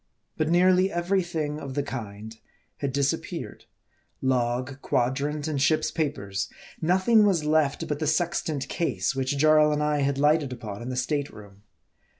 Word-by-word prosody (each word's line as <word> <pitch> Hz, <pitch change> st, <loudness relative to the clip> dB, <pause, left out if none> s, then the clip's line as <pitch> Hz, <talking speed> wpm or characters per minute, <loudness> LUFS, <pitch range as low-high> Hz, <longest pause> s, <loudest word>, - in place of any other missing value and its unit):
But 155 Hz, 0 st, 0 dB
nearly 185 Hz, +2 st, +4 dB
every 175 Hz, +3 st, +1 dB
thing 155 Hz, -4 st, -3 dB
of 135 Hz, -3 st, -7 dB
the 145 Hz, -, 0 dB
kind 110 Hz, -5 st, -7 dB, 0.4 s
had 140 Hz, -2 st, -2 dB
disappeared: 140 Hz, 0 st, -2 dB, 0.5 s
log, 130 Hz, +1 st, -1 dB
quadrant, 145 Hz, +5 st, -1 dB
and 145 Hz, -3 st, -1 dB
ship's 155 Hz, +1 st, +2 dB
papers. 105 Hz, -, -2 dB, 0.3 s
Nothing 190 Hz, +7 st, +4 dB
was 185 Hz, -7 st, +2 dB
left 150 Hz, -2 st, +1 dB
but 150 Hz, -1 st, -2 dB
the 155 Hz, -, -1 dB
sextant 160 Hz, -2 st, 0 dB
case, 115 Hz, -, -1 dB
which 135 Hz, +1 st, -1 dB
Jarl 155 Hz, +1 st, +5 dB
and 150 Hz, 0 st, 0 dB
I 150 Hz, 0 st, +1 dB
had 140 Hz, 0 st, 0 dB
lighted 150 Hz, -1 st, +2 dB
upon 110 Hz, -4 st, -7 dB
in 120 Hz, -, -5 dB
the 130 Hz, -, -3 dB
state 145 Hz, +2 st, -1 dB
room. 100 Hz, -2 st, -14 dB
145 Hz, 155 wpm, -26 LUFS, 130-155 Hz, 0.5 s, Jarl